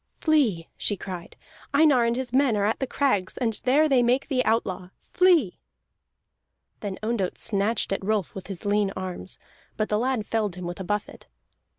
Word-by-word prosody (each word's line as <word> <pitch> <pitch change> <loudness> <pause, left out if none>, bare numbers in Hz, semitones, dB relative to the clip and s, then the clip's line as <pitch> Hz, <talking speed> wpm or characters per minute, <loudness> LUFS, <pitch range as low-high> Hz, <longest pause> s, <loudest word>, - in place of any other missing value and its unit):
"Flee!" 250 - +2
she 205 - -1
cried. 180 -2 -7 0.4
"Einar 285 -5 +5
and 235 0 +1
his 255 -1 -4
men 260 -5 +3
are 200 - +1
at 220 - 0
the 265 - -1
crags, 205 -10 0
and 230 -3 0
there 290 +5 +4
they 265 -4 +4
make 250 +4 +1
thee 260 -3 +2
outlaw. 190 -5 0
Flee!" 345 - +3 1.2
Then 200 -3 -5
Ondott 215 -5 -1
snatched 210 0 0
at 195 - -3
Rolf 210 -3 -1
with 190 - -8
his 195 0 -7
lean 205 0 +2
arms, 185 0 -6 0.4
but 215 - -1
the 210 - +1
lad 250 -3 0
felled 210 -5 -1
him 180 -1 -7
with 175 +1 -5
a - - -4
buffet. 205 +2 -4
215 Hz, 180 wpm, -25 LUFS, 195-255 Hz, 1.2 s, Einar